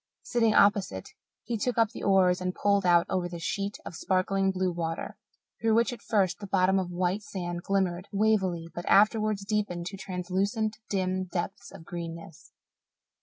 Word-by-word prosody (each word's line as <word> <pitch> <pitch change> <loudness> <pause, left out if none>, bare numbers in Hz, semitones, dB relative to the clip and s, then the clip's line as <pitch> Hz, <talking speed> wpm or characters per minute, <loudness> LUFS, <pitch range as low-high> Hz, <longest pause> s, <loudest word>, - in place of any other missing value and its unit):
Sitting 230 -2 +2
opposite, 200 - +3 0.3
he 230 0 -2
took 245 +3 -1
up 225 -2 +3
the - - -8
oars 185 -2 +3
and 180 0 -2
pulled 200 -2 +2
out 175 -1 +5
over 180 -2 -1
the 175 - -6
sheet 200 +5 -3
of - - -7
sparkling 195 +2 +1
blue 185 -1 0
water, 165 -1 -4 0.5
through 225 -1 +3
which 235 +2 +2
at 245 - -10
first 195 -5 +1
the 200 - -7
bottom 190 0 +3
of 185 -2 -3
white 180 +3 -1
sand 175 -4 -5
glimmered 185 -1 -1
wavily 195 -5 +1
but 175 - -6
afterwards 210 -1 +3
deepened 200 -5 -1
to 195 +2 -6
translucent, 195 +4 -2
dim 185 -1 -1
depths 190 +2 -5
of 160 - -12
greenness. 170 -1 -8
190 Hz, 170 wpm, -28 LUFS, 180-205 Hz, 0.5 s, out